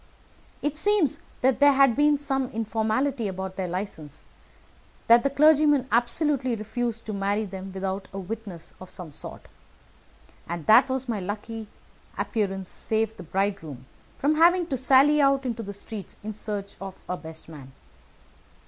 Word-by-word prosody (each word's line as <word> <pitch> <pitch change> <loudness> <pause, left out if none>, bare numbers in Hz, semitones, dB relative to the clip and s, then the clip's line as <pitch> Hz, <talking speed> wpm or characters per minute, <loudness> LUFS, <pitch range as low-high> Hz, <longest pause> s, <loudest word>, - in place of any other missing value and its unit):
It 295 0 -1
seems 400 -5 +2 0.2
that 260 0 +3
there 285 0 +7
had 270 -3 +5
been 295 0 +4
some 270 -2 -1
informality 225 +3 -1
about 190 0 -5
their 190 -2 -2
license; 175 -5 -6 0.8
that 235 +1 +7
the 275 - +1
clergyman 295 -2 +4
absolutely 255 +2 +1
refused 225 +1 -3
to 215 - -4
marry 200 +2 0
them 190 0 -7
without 190 0 -4
a 195 - -7
witness 195 -3 -6
of 185 - -10
some 175 -4 -8
sort, - - -7 1.1
and 170 -2 -4
that 220 +5 +7 0.2
my 225 -4 -1
lucky 210 +3 -5 0.5
appearance 195 -4 -2
saved 220 +2 -1
the - - -8
bridegroom 175 -7 -3 0.3
from 300 +2 +1
having 350 +2 +5
to 270 - 0
sally 270 +4 +5
out 275 -1 +3
into 235 -2 -2
the 200 -2 -6
streets 200 -1 -8
in 215 +1 -4
search 205 -1 -5
of 195 -1 -8
a 180 - -2
best 160 -2 -9
man. 145 -5 -11
220 Hz, 150 wpm, -26 LUFS, 195-270 Hz, 1.1 s, there